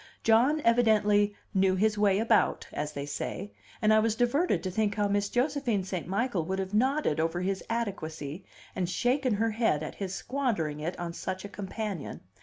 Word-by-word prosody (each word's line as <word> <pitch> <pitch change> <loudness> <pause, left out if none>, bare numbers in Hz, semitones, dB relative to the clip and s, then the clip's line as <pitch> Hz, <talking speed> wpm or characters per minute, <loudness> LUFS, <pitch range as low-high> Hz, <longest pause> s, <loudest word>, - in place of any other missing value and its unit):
John 250 +8 +4
evidently 210 -4 +3 0.2
"knew 190 -1 +3
his 210 +3 +2
way 205 -2 +3
about," 225 0 +2
as 150 0 -3
they 140 -1 -4
say; 145 +7 -5 0.3
and 215 0 +5
I 215 - +6
was 220 0 +1
diverted 245 - +1
to 185 - -2
think 210 +1 0
how 205 -1 +1
Miss 200 0 0
Josephine 250 -5 0
St. 185 -3 -4
Michael 200 -1 0
would 190 +2 -2
have 190 +1 -3
nodded 260 - +2
over 165 +2 0
his 190 +1 -2
adequacy 175 -8 -4 0.3
and 180 -2 -1
shaken 250 +5 +1
her 225 +2 +1
head 215 -9 +1
at - - -5
his 195 -2 -4
squandering 210 - -2
it 165 +4 -4
on 170 -1 -4
such 185 +2 -5
a - - -7
companion. 200 -3 -5
205 Hz, 185 wpm, -29 LUFS, 185-230 Hz, 0.3 s, I